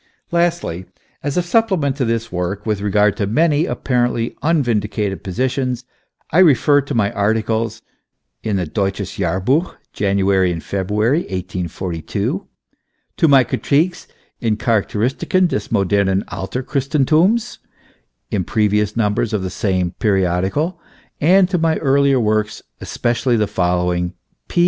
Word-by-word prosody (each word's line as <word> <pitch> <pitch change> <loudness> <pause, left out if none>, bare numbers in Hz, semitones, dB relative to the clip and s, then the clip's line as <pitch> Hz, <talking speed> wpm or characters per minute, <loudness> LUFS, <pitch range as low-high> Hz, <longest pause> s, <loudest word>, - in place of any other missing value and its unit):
Lastly, 170 - 0 0.4
as 145 +2 -3
a 180 - +2
supplement 175 - +1
to 130 - 0
this 115 0 -2
work 90 +3 -3
with 105 -3 -1
regard 105 0 +2
to 100 - -1
many 155 - +2
apparently 120 -2 -1
unvindicated 110 - 0
positions, 125 +4 -2 0.5
I 165 - +3
refer 145 -4 +5
to 140 0 -5
my 100 -3 +2
articles 110 +2 -1 0.6
in 105 - -1
the 90 -2 0
Deutsches 95 +4 -2
Jahrluch, 95 - 0 0.2
January 95 -2 +2
and 85 -2 -5
February, 105 - 0
1842, 90 - -4 0.7
to 165 - +4
my 135 -3 +6
cri - - -3
tiques 165 +5 0 0.3
and 110 -4 0
Charakteristiken 115 - +1
des 105 -11 -3
modernen 100 0 +1
After 125 +7 -4
christenthums, 155 - +1 0.7
in 100 -3 0
previous 105 +2 0
numbers 105 0 0
of 105 -3 -1
the 95 - -3
same 95 -5 -1
periodical, 100 - 0 0.4
and 180 +5 +5
to 180 - +1
my 160 -1 +2
earlier 140 -1 +3
works, 110 -2 0 0.2
especially 120 +1 0
the 105 - +2
following: 90 -1 0 0.3
P. - - -2
110 Hz, 130 wpm, -19 LUFS, 95-140 Hz, 0.7 s, my